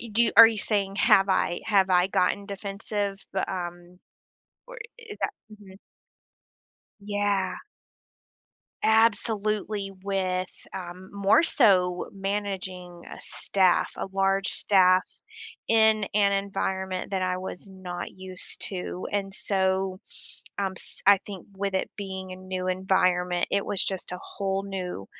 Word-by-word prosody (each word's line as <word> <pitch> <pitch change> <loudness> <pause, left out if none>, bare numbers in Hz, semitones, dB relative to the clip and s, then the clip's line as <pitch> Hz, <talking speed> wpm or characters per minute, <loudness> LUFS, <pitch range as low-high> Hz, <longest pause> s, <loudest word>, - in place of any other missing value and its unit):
you 230 -3 -9
do 235 +2 +3
are 230 +1 +12
you 225 -1 -1
saying 200 -2 +1
have 195 -1 +5
I 175 -2 +1
have 195 -3 +3
I 180 0 +4
gotten 200 +1 0
defensive, 200 0 -4
bu 190 - 0
um, 175 -1 -6 0.7
or - - -11 0.2
is 450 -3 -10
that - - 0 0.2
Mhm. 200 -2 -14 1.3
Yeah. 205 -2 0 1.3
Absolutely, 215 -2 +1
with, 185 -2 -1 0.3
um, 185 0 -8
more 200 +10 +4
so 185 - +3
managing 190 -3 -4
a - - -12
staff, 185 -3 +1
a - - -2
large 195 0 +2
staff 185 -2 +4 0.6
in 220 -2 +4
an 200 -1 +4
environment 190 -1 -2
that 190 -1 -1
I 185 0 0
was 185 +1 -7
not 185 -2 -7
used 185 -1 -3
to, 180 -1 -5
and 195 -1 -2
so, 190 -1 0 0.6
um, 195 -1 -1
s - - -11
I 200 -1 +8
think 195 -3 -9
with 195 0 -2
it 190 - 0
being 190 -2 -6
a 185 - -7
new 185 0 -5
environment, 180 -1 +1
it 200 0 +1
was 205 -2 0
just 190 -2 -2
a 180 - -5
whole 195 -1 -3
new 180 - -5
195 Hz, 135 wpm, -26 LUFS, 185-200 Hz, 1.3 s, are